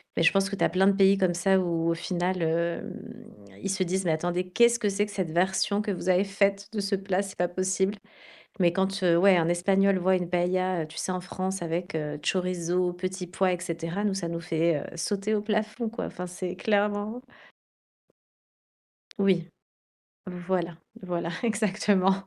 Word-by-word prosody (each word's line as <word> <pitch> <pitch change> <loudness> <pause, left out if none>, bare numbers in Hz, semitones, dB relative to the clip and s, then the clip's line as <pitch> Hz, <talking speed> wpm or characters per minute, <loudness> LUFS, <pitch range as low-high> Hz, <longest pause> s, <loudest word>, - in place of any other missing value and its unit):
Mais 165 - +1
je 165 - +6
pense 195 0 +2
que 200 - -3
tu - - -1
as - - +4
plein 190 +1 +3
de 200 - +5
pays 195 0 +5
comme 185 -3 +2
ça 190 +2 +3
où, 170 -2 0
au - - +3
final, 180 +1 -2
hem, 170 +1 -1 0.7
ils 195 - -3
se 190 0 +1
disent: 185 +1 -1
«Mais 165 - +2
attendez, 175 +3 -1
qu'est-ce 235 +4 +4
que 210 - 0
c'est 200 +1 +1
que 205 - -10
cette 185 -5 -3
version 190 +4 +1
que 210 -1 -2
vous 185 0 -5
avez 185 +1 +4
faite 200 0 0
de 210 - -2
ce 200 0 0
plat, 195 0 -1
c'est 195 -1 -7
pas 175 0 +1
possible?» 190 +2 0 0.7
Mais 170 -1 +4
quand, 190 +1 -1
heu, 170 -1 +4
ouais, 190 0 +6
un 165 -1 +2
Espagnol 195 +2 +3
voit 185 +1 +3
une 180 -1 -3
paëlla, 180 0 +1
heu, - - -8
tu 160 +1 -14
sais, 185 - -2
en 185 - -2
France 185 +1 -4
avec, 170 +1 -3
heu, 150 -1 -3
chorizo, 180 -1 0
petits 185 0 -4
pois, 185 +1 +1
et 175 - -2
cetera, 170 +3 -3
nous, 200 -2 +1
ça 180 -3 -3
nous 170 0 -3
fait, 165 -1 +1
heu, 155 - -8
sauter 200 +5 -1
au 205 - 0
plafond, 215 +1 -1
quoi. 235 - -4
Enfin, 180 0 -6
c'est 180 0 -5
clairement 210 +3 0 2.0
Oui. 185 -3 +2 1.0
Voilà, 175 -3 -1 0.3
voilà, 175 -2 -2
exactement. 205 -3 +2
185 Hz, 195 wpm, -27 LUFS, 175-195 Hz, 2.0 s, je